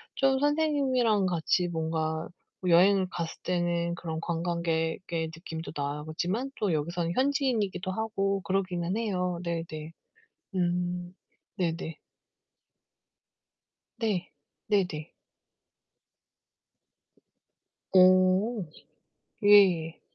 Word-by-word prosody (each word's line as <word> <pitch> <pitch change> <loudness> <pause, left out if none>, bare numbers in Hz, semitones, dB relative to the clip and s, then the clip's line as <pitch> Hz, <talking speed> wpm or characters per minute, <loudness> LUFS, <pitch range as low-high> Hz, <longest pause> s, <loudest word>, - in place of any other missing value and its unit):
좀 270 -1 +3
선생님이랑 275 -8 +2
같이 175 0 +1
뭔가 160 -1 -2 0.3
뭐 185 - -2
여행을 185 +2 +5
갔을 170 -3 -4
때는 175 -1 0
그런 160 -2 -5
관광객의 165 0 -2
느낌도 165 -1 -7
나지만 155 - -3
또 200 -5 +1
여기서는 170 +3 -1
현지인이기도 255 -10 0
하고 195 -2 -1
그러기는 185 0 -1
해요. 180 -6 -1
네네. 165 -2 -4 0.6
음. 175 0 -1 0.4
네네. 165 -3 -2 2.0
네. 205 -6 -1 0.4
네네. 180 -7 0 2.8
어. 185 +3 +5 0.8
예예. 185 -6 +5
180 Hz, 180 characters per minute, -28 LUFS, 165-200 Hz, 2.8 s, 여행을